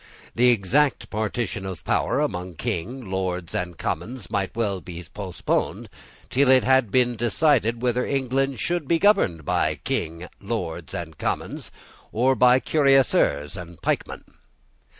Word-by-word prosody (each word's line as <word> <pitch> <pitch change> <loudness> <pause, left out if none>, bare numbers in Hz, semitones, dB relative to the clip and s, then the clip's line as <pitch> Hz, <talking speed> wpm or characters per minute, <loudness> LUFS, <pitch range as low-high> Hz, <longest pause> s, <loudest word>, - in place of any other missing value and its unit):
The 125 +2 +4
exact 125 +6 +2
partition 110 -1 -2
of 95 -3 -7
power - - +1
among 90 0 -3
King, 120 - -4
Lords, 90 -2 -2
and 90 -2 -3
Commons 120 -1 -4
might 100 -2 -1
well 100 -5 -1
be 85 0 -8
postponed 95 -4 -2 0.4
till 135 +1 +3
it 130 -1 +6
had 130 -3 +3
been 125 +2 +2
decided 120 0 +2
whether 125 0 +1
England 135 -1 -1
should 175 -4 -1
be 165 - +3
governed 165 - +3
by - - +1
King, 85 +3 -3
Lords, 90 -7 -4
and 80 -3 -6
Commons, - - -3 0.4
or 125 +4 +3
by 125 0 +5
cuirassiers 135 - +2
and 85 -3 -9
pikemen. - - -2
115 Hz, 135 wpm, -24 LUFS, 90-130 Hz, 0.4 s, it